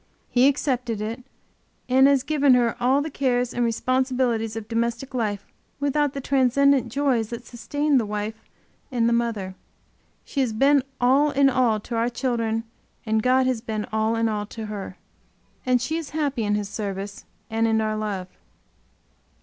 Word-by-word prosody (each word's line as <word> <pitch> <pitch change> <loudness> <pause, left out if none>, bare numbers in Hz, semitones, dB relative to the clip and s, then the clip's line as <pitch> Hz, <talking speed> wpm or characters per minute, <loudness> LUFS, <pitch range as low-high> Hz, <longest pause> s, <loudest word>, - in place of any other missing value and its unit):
He 250 +2 +5
accepted 250 -5 0
it, 225 +4 -4 0.6
and 265 +2 +5
as 275 -2 +3
given 285 -4 +4
her 235 -2 +2
all 265 +4 +3
the 315 - -5
cares 250 -3 0
and 245 - 0
responsibilities 245 -2 0
of 225 -2 -6
domestic 235 +3 -2
life 210 -5 -2 0.3
without 285 0 +1
the 275 - -4
transcendent 270 -1 +3
joys 255 -5 +1
that 235 0 -7
sustain 290 +4 0
the 225 - -1
wife 210 +2 -5 0.4
and 235 -2 +1
the 235 - +2
mother. 225 -5 -1 0.7
She 280 - -4
has 250 -4 +1
been 275 +5 +4 0.2
all 270 +4 +4
in 275 -1 +3
all 245 -4 +2
to 235 - -6
our 230 +1 +1
children 235 -3 -1 0.4
and 220 0 +1
God 255 +2 +3
has 255 -3 0
been 215 -2 -3
all 220 +1 +1
in 225 0 +1
all 210 -1 -2
to 220 0 -7
her. 200 -3 -6 0.7
And 250 -1 +4
she 310 +6 -2
is 325 -3 -5
happy 280 -7 0
in 205 0 +1
His 210 -1 -2
service 200 -1 -5 0.3
and 225 +1 +1
in 220 0 +2
our 215 0 0
love. 205 -4 -3
240 Hz, 170 wpm, -24 LUFS, 220-265 Hz, 0.7 s, He